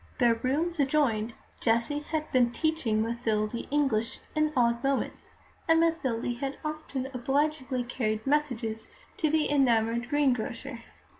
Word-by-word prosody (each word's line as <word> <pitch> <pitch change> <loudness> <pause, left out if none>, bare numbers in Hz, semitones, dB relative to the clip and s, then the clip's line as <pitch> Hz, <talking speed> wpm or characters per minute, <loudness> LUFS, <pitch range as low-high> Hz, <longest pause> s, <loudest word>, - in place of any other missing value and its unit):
Their 240 -2 +4
rooms 295 +9 -1
adjoined; 260 -6 +1 0.2
Jessie 235 +5 +1
had 305 +1 -4
been 245 -3 +4
teaching 245 -8 0
Mathilde 220 -2 -1 0.2
English 270 -6 0
in 305 0 +2
odd 235 -1 +2
moments, 275 -1 -2 0.3
and 325 0 +6
Mathilde 260 -8 0
had 275 0 -3
often 305 -4 -4
obligingly 270 0 0
carried 220 -3 -2
messages 245 -7 -1 0.3
to 310 - +1
the 310 0 +2
enamoured 235 -4 +2
greengrocer. 255 -3 0
260 Hz, 125 wpm, -28 LUFS, 230-295 Hz, 0.3 s, and